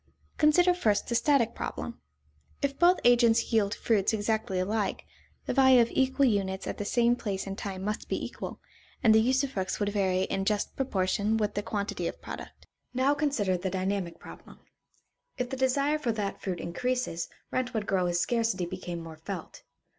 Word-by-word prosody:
Consider 350 +4 +5
first 215 - +1
the - - -2
static 235 -2 +3
problem. 235 - -5 0.6
If 275 0 -1
both 355 +1 +5
agents 235 -1 +4
yield 210 -2 +2
fruits 215 -1 +1
exactly 220 -2 -1
alike, 205 +2 -1 0.4
the - - -1
value 260 -2 +6
of 235 -1 +3
equal 265 +1 +2
units 195 -5 0
at - - -5
the 205 - -2
same 240 +2 +3
place 200 -5 -3
and 195 0 -5
time 190 -2 -5
must 210 +1 -3
be - - -1
equal, - - -7 0.4
and 220 - +6
the 220 - +6
usufructs 260 -5 0
would 205 -1 +1
vary 190 -3 +1
in 195 0 -1
just 210 0 -1
proportion 210 -3 0
with 210 -2 0
the 205 - -1
quantity 205 -1 -3
of - - -6
product. - - -9 0.3
Now 265 +3 +3
consider 275 -11 0
the 190 +2 -3
dynamic 190 -1 -2
problem. - - -13 0.8
If 250 0 -3
the - - -2
desire 275 +3 +1
for 245 -6 0
that 205 -2 -3
fruit 180 -3 -3
increases, 245 -1 -2 0.2
rent 255 -1 -2
would 215 -2 -1
grow 185 -3 +1
as 175 0 0
scarcity 225 -3 0
became 175 -1 -6
more 160 -1 -9
felt. 175 +1 -7
215 Hz, 175 wpm, -29 LUFS, 195-255 Hz, 0.8 s, value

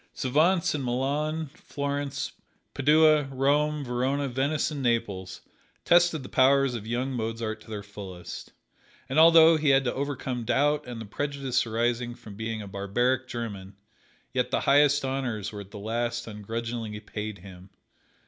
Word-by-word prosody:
Savants 160 +7 +2
in 145 -3 -2
Milan, 145 +5 -1
Florence, 140 -2 -4 0.4
Padua, 150 +1 +5
Rome, 145 +2 +1
Verona, 130 +3 0
Venice 140 +5 0
and 145 -2 -4
Naples, 100 -7 -1 0.4
tested 175 -4 +4
the - - -8
powers 135 0 +4
of 110 -2 -6
young 125 +3 -1
Mozart 115 -2 -3
to - - -16
their 105 -2 -5
fullest; 95 -3 -9 0.6
and 135 +4 +1
although 165 0 +8
he 155 -1 +1
had 135 0 +5
to 125 - -1
overcome 135 -3 -3
doubt 145 +5 +1
and 120 -2 -6
the 110 - -6
prejudice 135 +2 -1
arising 120 +1 -1
from 105 - -12
being 110 0 -4
"a - - -9
barbaric 120 +7 0
German," 100 -6 -6 0.6
yet - - 0
the - - 0
highest 145 0 +4
honors 125 -6 -2
were 105 -1 -7
at 100 - -12
the 105 - -10
last 120 +3 -2
ungrudgingly 115 0 -5
paid 105 -1 -6
him. 95 0 -13
125 Hz, 150 wpm, -27 LUFS, 110-145 Hz, 0.6 s, although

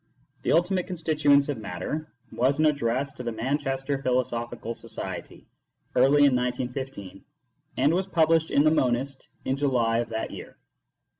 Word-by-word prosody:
" - - -40
The - - 0
Ultimate 180 +2 +2
Constituents 155 -5 +2
of 145 -5 -3
Matter 110 - -5
" - - -36
was 130 +5 +1
an 155 - +3
address 140 -2 +1
to - - -8
the 120 -1 -3
Manchester 135 +3 -2
Philosophical 120 -3 -1
Society, - - -7 0.5
early 145 +1 +5
in 135 -3 +4
1915, 125 -5 -4 0.5
and 140 +5 +3
was 185 +2 0
published 160 -2 +3
in 145 - +4
the 155 - +5
Monist 130 -2 0 0.2
in 130 - +1
July 120 -5 +2
of 120 - -2
that 110 -1 -3
year. - - -10
135 Hz, 155 wpm, -26 LUFS, 120-150 Hz, 0.5 s, early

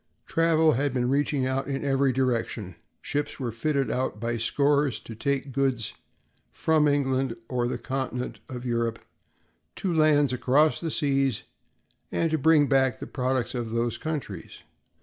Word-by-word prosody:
Travel 160 -1 +3
had 140 0 0
been 125 0 +1
reaching 140 -1 +1
out 130 +1 -1
in 140 0 -3
every 135 -1 +2
direction; 120 -6 -1 0.3
ships 145 +1 -3
were 125 -3 -2
fitted 135 +4 0
out 130 -4 -2
by 120 +1 -1
scores 140 +1 +1
to 115 - -9
take 140 +4 -2
goods 130 -4 0 0.6
from 155 -2 +2
England 135 -3 +1
or 120 -1 0
the 120 - -2
continent 130 0 -4
of 125 -1 -6
Europe 115 -1 0 0.8
to 185 -3 -2
lands 150 -4 +4
across 140 +5 +3
the 165 - -3
seas 135 -5 +1 0.7
and 165 -1 0
to 160 - +1
bring 155 0 +5
back 135 -2 +2
the - - -7
products 130 -2 -1
of 120 -3 -3
these 115 +1 -1
countries. 155 -5 -5
135 Hz, 150 wpm, -26 LUFS, 120-145 Hz, 0.8 s, bring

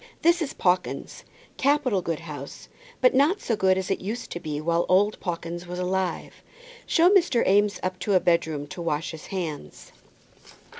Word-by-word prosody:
This 340 +1 +4
is 290 - -2
Pawkins's, 180 0 -1 0.3
capital 275 -8 +2
good 170 -2 -3
house, 145 -4 -9 0.3
but 255 - +5
not 295 +9 +3
so 230 - -1
good 190 -2 +3
as 190 +1 -2
it 195 - -1
used 215 +6 -5
to 175 - -4
be 150 -3 -4
while 170 +2 +1
old 205 +3 +3
Pawkins 175 -1 -5
was 180 0 -6
alive. 185 0 -2 0.5
Show 340 +3 +4
Mr. 345 - +3
Eames 205 +1 +3
up 185 0 -2
into 195 +2 0
a - - +6
bedroom 160 -4 0
to 175 - -7
wash 160 -2 -2
his 160 -1 -10
hands." 160 - -6
185 Hz, 170 wpm, -25 LUFS, 170-220 Hz, 0.5 s, a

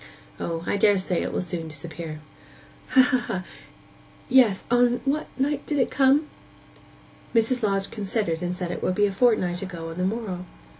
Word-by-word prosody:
O, 165 -1 -3
I 205 - 0
daresay 195 -3 +3
it - - -2
will - - -1
soon 175 -2 -5
disappear.' 155 0 -7 0.7
'Ha, 260 - +6
ha! 245 -8 0 0.9
Yes... 245 -7 +5
On 245 0 +4
what 290 +3 0
night 280 +1 0
did 295 - 0
it 260 - +1
come?' 275 +3 +4 1.1
Mrs. 230 +3 +2
Lodge 195 -2 0
considered, 205 -5 -2
and 180 0 -2
said 180 -1 -3
it - - -5
would 185 - 0
be 205 - +4
a 200 - 0
fortnight 190 -5 +2
ago 170 -4 -6
on 165 - -7
the - - 0
morrow. 190 -3 -3
200 Hz, 165 wpm, -25 LUFS, 180-245 Hz, 1.1 s, Ha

